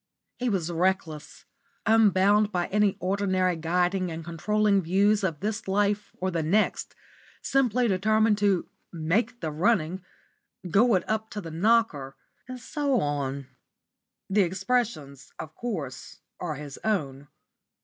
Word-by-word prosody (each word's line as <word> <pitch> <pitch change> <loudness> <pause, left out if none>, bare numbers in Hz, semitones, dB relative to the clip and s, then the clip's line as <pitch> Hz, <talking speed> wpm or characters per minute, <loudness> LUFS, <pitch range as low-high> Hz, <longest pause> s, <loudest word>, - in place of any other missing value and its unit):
He 250 0 0
was 175 -5 -1
reckless, 170 -3 -2 0.4
unbound 210 -1 +4
by 175 -2 0
any 210 -1 +2
ordinary 185 -1 0
guiding 180 +3 0
and 165 0 -6
controlling 200 +4 +1
views 200 +4 +2
of 165 -6 -2
this 210 +1 -3
life 205 +1 0
or 185 +1 -2
the 170 -2 -1
next, 195 +8 0 0.5
simply 250 -3 +2
determined 215 +2 +2
to 200 -3 +1 0.2
"make 200 +9 -1
the 160 -2 -2
running," 180 +1 0 0.6
"go 215 +6 +4
it 180 - -1
up 220 0 -2
to 210 - -6
the 165 -3 -8
knocker," 170 -7 +1 0.3
and 255 0 -7
so 280 +1 -1
on. 140 -3 -2 0.8
The 200 +2 +2
expressions, 190 - -2
of 155 0 -8
course, 160 - -6 0.2
are 160 -4 -3
his 145 -1 -9
own. 145 -10 -2
190 Hz, 130 wpm, -26 LUFS, 165-215 Hz, 0.8 s, unbound